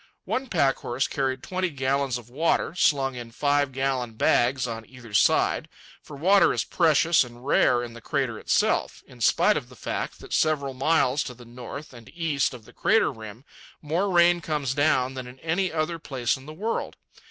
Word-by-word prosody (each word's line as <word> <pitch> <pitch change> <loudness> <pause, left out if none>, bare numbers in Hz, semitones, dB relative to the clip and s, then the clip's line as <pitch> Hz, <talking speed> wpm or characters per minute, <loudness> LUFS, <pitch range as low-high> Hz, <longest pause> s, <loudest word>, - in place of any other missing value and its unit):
One 265 +1 -2
packhorse 135 - 0
carried 135 -2 -2
twenty 185 0 -2
gallons 135 -2 -1
of 120 -2 -12
water, 150 +5 0
slung 140 -6 +2
in 120 -2 -8
five 145 +3 +1
gallon 130 -3 -2
bags 120 +3 +2
on 115 -2 -5
either 120 -4 -13
side; - - +2 0.3
for 150 - -11
water 190 +7 +4
is - - 0
precious 165 -1 +3
and 120 0 -13
rare 125 -3 +3
in 120 -1 -7
the 115 - -11
crater - - -2
itself, - - 0
in - - -16
spite - - +4
of - - -6
the - - -14
fact - - -4
that - - -9
several 145 -4 +1
miles 135 0 +2
to 125 - -7
the 120 0 -14
north 125 +5 -9
and 115 -2 -13
east 155 -6 0
of 115 -3 -13
the - - -17
crater 225 0 +2
rim 110 +1 -11 0.3
more 170 +7 -1
rain 175 -1 +4
comes 150 -5 -2
down 135 -3 +2
than 130 -1 -6
in 125 +1 -12
any 175 +3 0
other 165 +1 -2
place 130 -6 -1
in 130 +1 -12
the - - -7
world. 215 +8 -3
135 Hz, 185 wpm, -25 LUFS, 125-160 Hz, 0.3 s, water